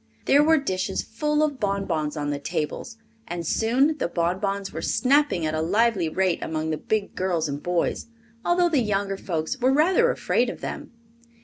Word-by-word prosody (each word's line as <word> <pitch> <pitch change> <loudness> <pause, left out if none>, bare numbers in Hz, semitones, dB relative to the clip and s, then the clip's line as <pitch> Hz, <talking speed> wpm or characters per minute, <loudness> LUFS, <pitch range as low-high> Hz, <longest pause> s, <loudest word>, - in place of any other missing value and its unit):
There 285 +2 +5
were 320 +1 +5
dishes 185 -10 -2
full 300 +6 0
of 290 -4 -1
bonbons 180 -7 -1
on 145 0 -2
the 145 - -3
tables, 165 - -4 0.3
and 170 0 -4
soon 260 - +2
the - - 0
bonbons 190 +4 -2
were - - -4
snapping 270 - +2
at 155 - -1
a 155 - 0
lively 200 0 +2
rate 185 +1 0
among 160 0 -2
the 155 - -1
big 215 +3 -2
girls 175 -4 -1
and 140 0 -4
boys, 175 +4 -1 0.4
although 350 0 +3
the 295 -6 +2
younger 200 -2 -1
folks 170 +5 -3
were 255 +1 +3
rather 370 - +4
afraid - - +1
of - - -7
them. - - -6
195 Hz, 180 wpm, -24 LUFS, 165-270 Hz, 0.4 s, There